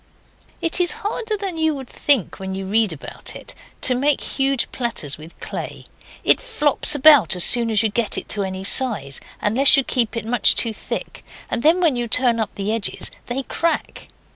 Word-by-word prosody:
It 335 +1 -1
is 355 +3 +1
harder 435 +1 -2
than 385 -5 -5
you 315 -1 +1
would 265 -2 -8
think 270 -7 0
when 190 0 -5
you 195 0 -5
read 215 +1 +1
about 155 - -7
it, - - -10 0.3
to 255 - +2
make 275 +3 +1
huge 270 -2 -1
platters 225 - -3
with 160 +2 -13
clay. - - -7 0.4
It - - +5
flops 295 0 +1
about 290 -6 +6
as 180 - +4
soon 235 -1 +3
as 215 -1 +2
you 220 - +1
get 225 +1 0
it - - -1
any 190 -2 -4
size, 195 - +2 0.2
unless 260 +7 +4
you 275 - +2
keep 235 -3 -1
it 230 - -5
much 235 0 +4
too 230 -2 0
thick, - - -7 0.3
and 235 - -1
then 330 +7 +3
when 320 -7 +2
you 240 -1 -3
turn 240 0 +2
up 220 - -3
the 200 +1 -3
edges 225 -3 -2 0.2
they 255 +3 -3
crack. 335 +5 -3
240 Hz, 190 wpm, -20 LUFS, 210-290 Hz, 0.4 s, about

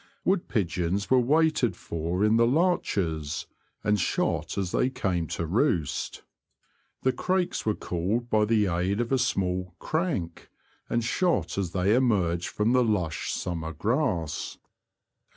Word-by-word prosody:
Wood 190 -1 +1
pigeons 95 -1 -1
were 130 - +6
waited 140 - +2
for 85 +4 -2
in 110 +1 +4
the 115 0 +5
larches, 100 - 0 0.4
and 105 -1 +2
shot - - -1
as 95 -3 -1
they 125 - +2
came 90 -9 -1
to 85 - -1
roost. 90 - 0 0.8
The 130 - +4
crakes 185 -3 -1
were 105 - +2
called 100 +8 -2
by 110 -2 +3
the 110 -1 +3
aid 90 +3 0
of 120 +1 -1
a 135 - +3
small 90 -7 -1
'' - - -49
crank," 150 - -2 0.4
and 120 0 +1
shot 175 +9 0
as 95 -4 -2
they 95 +2 +2
emerged 95 -9 +2
from 105 +2 0
the 125 -1 +5
lush 90 -9 -1
summer 80 -2 -3
grass. 100 - -1
105 Hz, 145 wpm, -27 LUFS, 85-125 Hz, 0.8 s, were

